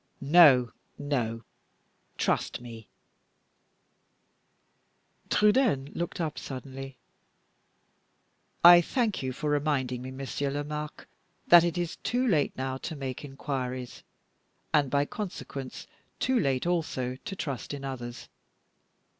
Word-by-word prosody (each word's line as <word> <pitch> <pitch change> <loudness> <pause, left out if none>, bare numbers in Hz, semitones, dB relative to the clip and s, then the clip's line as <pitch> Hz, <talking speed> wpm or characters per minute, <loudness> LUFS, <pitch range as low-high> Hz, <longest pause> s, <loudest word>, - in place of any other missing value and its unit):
No! 140 -5 +6 0.3
no! 120 -6 -2 0.7
trust - - 0
me 115 -3 -10 1.6
" - - -42
Trudaine 210 - +3
looked 175 +1 -4
up 155 -3 -2
suddenly. 135 0 -8 1.7
"I 175 0 +10
thank 225 - -1
you 130 -1 -2
for 145 +4 -3
reminding 140 -4 0
me, 130 - -6
Monsieur 135 +1 -3
Lomaque, 150 +1 -5 0.4
that 175 -1 +8
it 175 0 -1
is 175 -1 -2
too 250 +1 -1
late 160 -10 +1
now 130 0 -2
to 160 +4 -6
make 135 -2 -5
inquiries, 130 -3 -5 0.7
and 145 -3 +3
by 140 +2 +2
consequence 175 - -6 0.3
too 260 -1 +2
late 135 - 0
also 155 -8 -1
to 195 - -5
trust 140 -9 -4
in 140 -1 -5
others. 120 -3 -6
140 Hz, 115 wpm, -28 LUFS, 130-170 Hz, 1.7 s, I